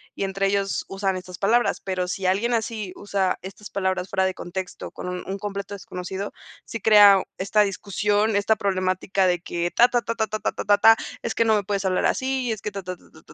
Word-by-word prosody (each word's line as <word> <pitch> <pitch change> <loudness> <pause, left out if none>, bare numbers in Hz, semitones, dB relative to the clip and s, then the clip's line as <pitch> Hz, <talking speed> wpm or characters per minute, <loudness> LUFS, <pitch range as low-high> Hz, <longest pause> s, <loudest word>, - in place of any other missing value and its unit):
y - - -2
entre 195 0 0
ellos 195 0 0
usan 195 -1 -1
estas 180 -1 -9
palabras. 235 +4 +2
Pero 185 -2 -2
si 190 +1 -3
alguien 200 +6 +1
así 220 -4 -2
usa 195 -2 -1
estas 200 +2 -10
palabras 190 -1 -1
fuera 190 -1 +1
de 190 - 0
contexto 180 +1 -6
con - - -7
un 180 0 -4
un 195 +1 -4
completo 200 0 -5
desconocido, 190 +1 -6 0.3
sí 230 - -6
crea 205 -3 +7
esta 200 +3 +2
discusión, 205 +2 0
esta 205 +2 +2
problemática 185 0 0
de 175 -1 +1
que: 175 0 -2
"Ta, 240 - +6
ta, 245 -1 +1
ta, 230 +1 -3
ta, 220 -1 0
ta, 215 +1 -4
ta, - - -1
ta, 205 0 +5
ta 225 +2 +7 0.3
es 225 - -2
que 230 - +2
no 220 -1 +4
me 205 - 0
puedes 195 0 -2
hablar 185 -1 +1
así 260 -2 -1
es 215 -3 -4
que 210 - -4
ta, 195 -1 -6
ta, 180 0 -6
ta, - - -22
ta, 80 - -18
ta, 80 - -17
195 Hz, 230 wpm, -24 LUFS, 190-215 Hz, 0.3 s, crea